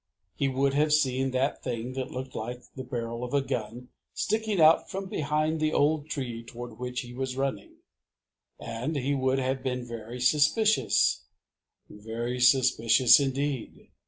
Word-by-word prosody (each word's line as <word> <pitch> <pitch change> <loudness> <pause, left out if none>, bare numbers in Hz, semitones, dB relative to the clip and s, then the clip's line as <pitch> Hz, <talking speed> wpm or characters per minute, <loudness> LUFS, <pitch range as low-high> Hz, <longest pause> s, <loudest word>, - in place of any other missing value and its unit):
He 140 - 0
would 135 +1 +1
have 150 +1 +2
seen 135 -3 +2
that 130 +2 -1
thing 120 0 -4
that 130 0 -4
looked 130 +1 -6
like 120 +3 -5
the 130 - -6
barrel 115 -1 -4
of 125 +3 -3
a 140 - +3
gun 120 0 -5 0.3
sticking 220 -3 -1
out 160 0 +5
from 195 +1 -4
behind 155 -1 -1
the 155 0 0
old 150 +1 +1
tree 120 -6 -4
toward 120 -1 -9
which 125 0 -3
he 120 -1 -10
was 130 0 -4
running, 135 -7 -3 0.8
and 115 +7 -4
he 140 0 0
would 130 -1 +1
have 130 0 -1
been 125 -2 -3
very 115 +1 -7
suspicious, 155 - +3 0.6
very 115 +4 -5
suspicious 125 -1 +5
indeed. 135 -2 -3
130 Hz, 155 wpm, -28 LUFS, 120-145 Hz, 0.8 s, out